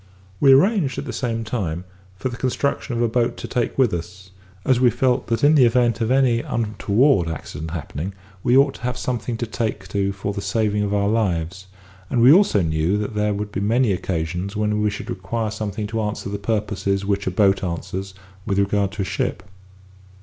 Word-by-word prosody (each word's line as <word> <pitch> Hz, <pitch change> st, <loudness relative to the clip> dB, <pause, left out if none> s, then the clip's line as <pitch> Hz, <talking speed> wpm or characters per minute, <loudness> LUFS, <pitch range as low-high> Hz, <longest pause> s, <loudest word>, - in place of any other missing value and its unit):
We 140 Hz, -, +6 dB
arranged, 160 Hz, -, +3 dB
at -, -, -4 dB
the 125 Hz, -, -5 dB
same 115 Hz, -2 st, -2 dB
time, 95 Hz, -8 st, -3 dB, 0.3 s
for 105 Hz, +7 st, -3 dB
the 120 Hz, -, -6 dB
construction 130 Hz, 0 st, -1 dB
of 120 Hz, -, +1 dB
a -, -, +3 dB
boat 120 Hz, +1 st, 0 dB
to -, -, -6 dB
take 120 Hz, -2 st, -2 dB
with 130 Hz, -7 st, +3 dB
us, 90 Hz, +2 st, -6 dB, 0.3 s
as 130 Hz, -2 st, +3 dB
we 125 Hz, -1 st, +5 dB
felt 125 Hz, +2 st, +1 dB
that 115 Hz, +3 st, -1 dB
in 145 Hz, +2 st, +6 dB
the 145 Hz, -4 st, +6 dB
event 120 Hz, -1 st, +2 dB
of 115 Hz, -, +1 dB
any 130 Hz, -3 st, +3 dB
untoward 110 Hz, -, +1 dB
accident 80 Hz, 0 st, -6 dB
happening, 80 Hz, +2 st, -5 dB, 0.3 s
we 125 Hz, +1 st, +3 dB
ought 140 Hz, 0 st, +4 dB
to -, -, -13 dB
have 125 Hz, 0 st, -2 dB
something 120 Hz, -2 st, -3 dB
to 120 Hz, -, -2 dB
take 110 Hz, -4 st, -3 dB
to 100 Hz, 0 st, 0 dB
for 100 Hz, +1 st, -4 dB
the 100 Hz, -, -4 dB
saving 105 Hz, -1 st, 0 dB
of 100 Hz, -1 st, -1 dB
our 100 Hz, -1 st, +1 dB
lives, 95 Hz, -4 st, -1 dB, 0.4 s
and 125 Hz, -, 0 dB
we 120 Hz, +3 st, +8 dB
knew 165 Hz, -, +9 dB
also 150 Hz, -, +3 dB
that 85 Hz, +7 st, 0 dB
there 105 Hz, 0 st, 0 dB
would 105 Hz, 0 st, -4 dB
be 95 Hz, -, -3 dB
many 115 Hz, +3 st, +2 dB
occasions 90 Hz, +2 st, -2 dB
when 105 Hz, 0 st, 0 dB
we 105 Hz, -, +2 dB
should 100 Hz, -, -6 dB
require 105 Hz, +4 st, -3 dB
something 105 Hz, -1 st, -4 dB
to 110 Hz, +1 st, -2 dB
answer 105 Hz, -1 st, -3 dB
the 100 Hz, 0 st, -4 dB
purposes 100 Hz, -2 st, -1 dB
which 100 Hz, 0 st, -1 dB
a -, -, +3 dB
boat 95 Hz, +1 st, +2 dB
answers 95 Hz, +2 st, -4 dB, 0.3 s
with 100 Hz, -2 st, -1 dB
regard 100 Hz, 0 st, +1 dB
to 105 Hz, -, -2 dB
a -, -, -3 dB
ship. 95 Hz, -, -2 dB
105 Hz, 210 wpm, -22 LUFS, 95-120 Hz, 0.4 s, knew